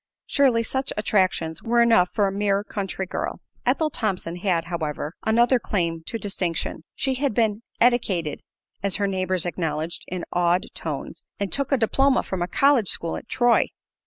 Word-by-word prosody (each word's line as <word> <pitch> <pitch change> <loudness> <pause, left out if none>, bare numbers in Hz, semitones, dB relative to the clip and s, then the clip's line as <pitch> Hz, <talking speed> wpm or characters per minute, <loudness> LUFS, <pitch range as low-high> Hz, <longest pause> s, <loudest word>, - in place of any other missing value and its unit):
Surely, 255 -5 +3
such 265 +4 -2
attractions 185 -6 +1
were 235 +1 +2
enough 225 -7 +5
for 205 - +2
a 195 - 0
mere 200 0 +1
country 195 -2 -4
girl. - - -4 0.3
Ethel 310 -1 +2
Thompson 185 -7 -2
had, 175 -3 0
however, 160 -2 -3
another 240 +3 +4
claim 170 -7 -1
to 230 - -2
distinction. 185 -7 -3
She 265 - 0
had 265 -3 -1
been 220 -2 +1 0.2
"eddicated," 205 - +2 0.4
as 200 -2 +1
her 205 - +1
neighbors 185 -2 0
acknowledged 165 -1 -3
in 180 -1 -4
awed 175 +1 +2
tones, - - -5 0.2
and 200 -2 -2
"took 275 0 0
a 275 - +4
diploma 270 +4 +3
from 190 -2 -4
a 175 - 0
college 275 -2 +3
school 165 - -1
at - - -8
Troy." 245 -2 +3
200 Hz, 165 wpm, -24 LUFS, 175-235 Hz, 0.4 s, enough